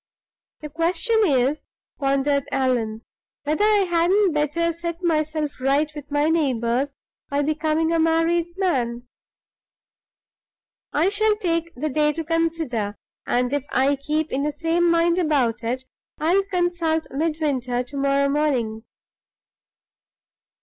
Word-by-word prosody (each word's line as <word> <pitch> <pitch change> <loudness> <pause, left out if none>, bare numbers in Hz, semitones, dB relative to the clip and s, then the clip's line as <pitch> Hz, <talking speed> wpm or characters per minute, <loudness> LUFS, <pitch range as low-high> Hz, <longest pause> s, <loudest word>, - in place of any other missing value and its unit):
"The 300 - -6
question 355 +9 +1
is," 280 -3 +1 0.3
pondered 275 0 +1
Allan, 235 -4 0 0.4
"whether 305 +7 0
I 420 -2 +4
hadn't 355 +3 +3
better 305 +3 0
set 340 +1 -6
myself 310 -3 -1
right 280 +3 +2
with 290 -1 -9
my 290 +1 +1
neighbors 270 -4 0 0.3
by 285 0 0
becoming 310 +2 0
a 330 - +2
married 330 +1 +2
man? 245 -10 -1 1.8
I'll 330 +7 +2
take 395 -6 0
the 305 +5 -2
day 300 +2 +2
to 325 - -4
consider; 320 -11 -1 0.3
and 250 +2 +1
if 285 -1 -2
I 270 +2 +2
keep 305 +3 -2
in 270 - -1
the 300 +1 0
same 330 +3 +1
mind 335 +1 +3
about 275 -9 +1
it, 250 +3 -2 0.3
I'll 365 +5 +2
consult 350 -4 0
Midwinter 275 -5 -1
to 255 +3 -10
morrow 275 0 +2
morning." 260 -7 0
305 Hz, 120 wpm, -23 LUFS, 275-335 Hz, 1.8 s, I